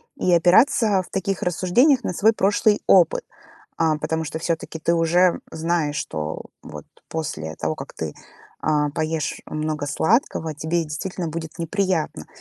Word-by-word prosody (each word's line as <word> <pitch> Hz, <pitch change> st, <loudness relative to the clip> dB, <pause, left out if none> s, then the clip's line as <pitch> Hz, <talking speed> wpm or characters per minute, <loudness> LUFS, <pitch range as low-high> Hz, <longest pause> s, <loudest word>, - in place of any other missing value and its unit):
И 180 Hz, -, 0 dB
опираться 190 Hz, +4 st, +4 dB
в 185 Hz, -, -13 dB
таких 195 Hz, 0 st, -2 dB
рассуждениях 235 Hz, -, +3 dB
на 180 Hz, -, -2 dB
свой 220 Hz, +6 st, +4 dB
прошлый 205 Hz, +1 st, +2 dB
опыт. 175 Hz, -4 st, +4 dB, 0.6 s
А, 160 Hz, -2 st, +3 dB
потому 160 Hz, +1 st, -2 dB
что 160 Hz, +1 st, -5 dB
все-таки 165 Hz, -1 st, -3 dB
ты 170 Hz, -, +1 dB
уже 170 Hz, +2 st, +3 dB
знаешь, 160 Hz, -2 st, -1 dB
что 75 Hz, -, -4 dB, 0.2 s
вот 75 Hz, -1 st, -9 dB, 0.2 s
после 80 Hz, -, -4 dB
того, 80 Hz, 0 st, -3 dB
как -, -, -8 dB
ты, -, -, -4 dB, 0.5 s
а, 150 Hz, -1 st, +1 dB
поешь 155 Hz, 0 st, -2 dB
много 155 Hz, -1 st, -3 dB
сладкого, 165 Hz, -, +1 dB
тебе 160 Hz, +3 st, -1 dB
действительно 165 Hz, +3 st, -4 dB
будет 160 Hz, 0 st, -6 dB
неприятно. 170 Hz, -, -1 dB
165 Hz, 145 wpm, -22 LUFS, 155-185 Hz, 0.6 s, опираться